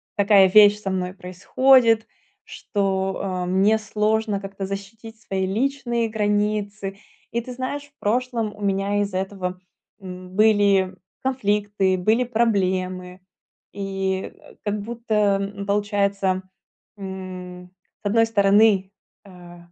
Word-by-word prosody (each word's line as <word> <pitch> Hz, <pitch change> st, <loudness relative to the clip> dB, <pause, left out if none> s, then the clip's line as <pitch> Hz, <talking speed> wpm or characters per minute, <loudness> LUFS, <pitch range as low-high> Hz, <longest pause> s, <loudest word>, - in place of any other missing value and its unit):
такая 200 Hz, -2 st, +5 dB
вещь 210 Hz, +1 st, +7 dB
со 195 Hz, -, -3 dB
мной 185 Hz, -1 st, -2 dB
происходит, 225 Hz, +6 st, +3 dB, 0.4 s
что, 195 Hz, -2 st, -2 dB
а, 185 Hz, -2 st, -2 dB
мне 195 Hz, +4 st, +3 dB
сложно 215 Hz, -1 st, 0 dB
как-то 195 Hz, 0 st, -6 dB
защитить 220 Hz, +3 st, -8 dB
свои 190 Hz, -2 st, -2 dB
личные 235 Hz, +1 st, -1 dB
границы. 210 Hz, -1 st, -1 dB, 0.3 s
И, 235 Hz, -, 0 dB
ты 250 Hz, +2 st, -8 dB
знаешь, 260 Hz, +3 st, -4 dB
в 285 Hz, 0 st, -23 dB
прошлом 230 Hz, -1 st, -1 dB
у 210 Hz, -, -14 dB
меня 200 Hz, +1 st, 0 dB
из-за 200 Hz, -2 st, -2 dB
этого, 185 Hz, -2 st, -4 dB, 0.4 s
м, 185 Hz, -1 st, -9 dB
были 200 Hz, -3 st, +4 dB, 0.3 s
конфликты, 205 Hz, -6 st, 0 dB
были 220 Hz, +7 st, +2 dB
проблемы. 185 Hz, -5 st, -1 dB, 0.5 s
И, 195 Hz, -1 st, -3 dB
э, -, -, -18 dB
как 205 Hz, -1 st, -2 dB
будто, 230 Hz, +1 st, -5 dB, 0.3 s
м, 200 Hz, 0 st, -5 dB
получается, 200 Hz, -2 st, 0 dB, 0.6 s
м, 185 Hz, -2 st, -8 dB, 0.3 s
с -, -, -38 dB
одной 225 Hz, +3 st, +3 dB
стороны, 200 Hz, -2 st, +3 dB, 0.3 s
э, 175 Hz, -2 st, -13 dB
200 Hz, 120 wpm, -23 LUFS, 190-220 Hz, 0.6 s, вещь